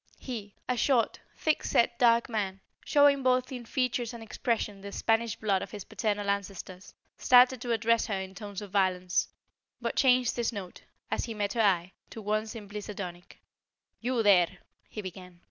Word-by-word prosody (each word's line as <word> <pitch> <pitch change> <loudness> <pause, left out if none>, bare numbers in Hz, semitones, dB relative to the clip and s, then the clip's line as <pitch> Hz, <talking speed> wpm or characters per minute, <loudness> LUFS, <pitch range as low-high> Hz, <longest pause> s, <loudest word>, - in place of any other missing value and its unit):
He, 215 -6 -7
a 250 - +1
short, 245 -1 +2 0.2
thick 310 -1 +1
set, 235 0 +2
dark 235 -1 +5
man, 200 -4 -2 0.2
showing 285 -1 +4
both 255 0 +2
in 245 -2 -6
features 245 -1 -1
and 230 - -8
expression 220 -3 -2
the 200 0 -7
Spanish 225 +2 +1
blood 200 -4 0
of - - -6
his 205 -2 -7
paternal 205 -2 -2
ancestors, 195 -1 -4 0.2
started 250 0 +6
to 245 -2 -3
address 230 0 +2
her 200 -3 -1
in 190 0 -6
tones 205 0 -7
of 200 - -10
violence, 185 -2 +1 0.5
but - - -3
changed 255 -3 +3
his 235 0 0
note, 195 -5 -8 0.3
as - - 0
he 230 - -6
met 205 -1 -1
her 230 - +1
eye, 185 -4 +2 0.2
to - - -9
one 215 +1 -1
simply 210 -2 -7
sardonic. 180 -4 -8 0.6
"You 240 -1 0
here!" 185 -4 +6 0.4
he 210 - -6
began. 180 -1 -9
215 Hz, 175 wpm, -29 LUFS, 195-240 Hz, 0.6 s, started